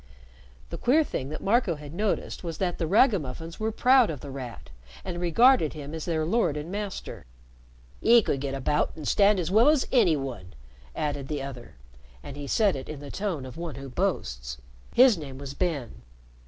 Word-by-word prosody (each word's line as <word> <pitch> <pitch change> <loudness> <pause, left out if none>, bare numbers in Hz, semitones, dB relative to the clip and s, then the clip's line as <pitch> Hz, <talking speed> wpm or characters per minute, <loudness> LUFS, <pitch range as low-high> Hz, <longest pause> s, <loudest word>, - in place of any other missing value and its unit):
The - - -5
queer 295 +6 +4
thing 135 - -4
that 155 - -6
Marco 205 -4 +2
had 150 0 -10
noticed 205 +1 -2
was 165 -2 -5
that 180 -2 -2
the 165 - -1
ragamuffins 165 - +1
were 220 +1 -1
proud 250 +1 +4
of 150 -5 -5
The 140 - -8
Rat, 125 - -8 0.3
and 175 - -4
regarded 180 - +4
him 150 -1 -8
as 160 -1 -5
their 160 -2 0
lord 170 -5 +1
and 150 +4 -6
master. 200 - -6 0.4
" - - -28
'E 235 0 +6
could 135 - -1
get 135 -1 -3
about 135 +2 0
an' 155 - -8
stand 200 +3 +4
as 175 0 -2
well 225 +7 +6
as 300 -3 +2
any 200 - +4
one," 120 - -7 0.4
added 145 -2 -2
the 145 -2 -3
other, 130 -3 -9 0.5
and 135 - -8
he 145 -1 -7
said 205 +5 +2
it 130 - -7
in 155 -2 -6
the 145 -1 -9
tone 185 -10 -3
of 130 +4 -10
one 170 -4 -5
who 135 0 -8
boasts. 60 - -2 0.4
His 245 -7 +6
name 135 -4 -8
was 140 0 -7
Ben. 140 - -3
155 Hz, 195 wpm, -27 LUFS, 135-200 Hz, 0.5 s, E